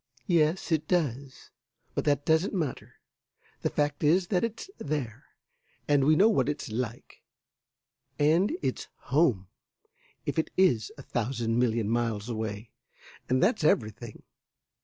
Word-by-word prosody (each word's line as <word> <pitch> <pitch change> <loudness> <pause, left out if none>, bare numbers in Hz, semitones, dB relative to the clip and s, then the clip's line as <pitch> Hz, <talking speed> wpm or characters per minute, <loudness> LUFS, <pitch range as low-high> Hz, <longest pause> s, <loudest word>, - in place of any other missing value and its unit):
"Yes, 165 +1 +1
it 155 -1 +1
does, 140 -6 -2 0.4
but - - -2
that 145 -1 +1
doesn't 160 +5 +2
matter. 155 -8 -3 0.7
The - - 0
fact 145 0 -1
is 175 +4 +3
that 185 -1 +1
it's 230 - -3
there, 135 -5 -4 0.6
and 145 -2 +3
we 155 +2 +5
know 195 +7 +6
what 220 -8 +2
it's 145 -6 -4
like, 120 +1 -5 1.0
and 160 +7 +3
it's 130 -2 -2
home, 125 - +1 0.8
if - - -1
it 160 - -1
is 120 - +3
a 140 - -10
thousand 120 -1 -1
million 115 -3 +1
miles 115 -1 -1
away, 110 -1 -4 0.6
and 130 +4 +2
that's 210 -2 +2
everything." 110 -5 0
140 Hz, 135 wpm, -28 LUFS, 115-160 Hz, 1.0 s, know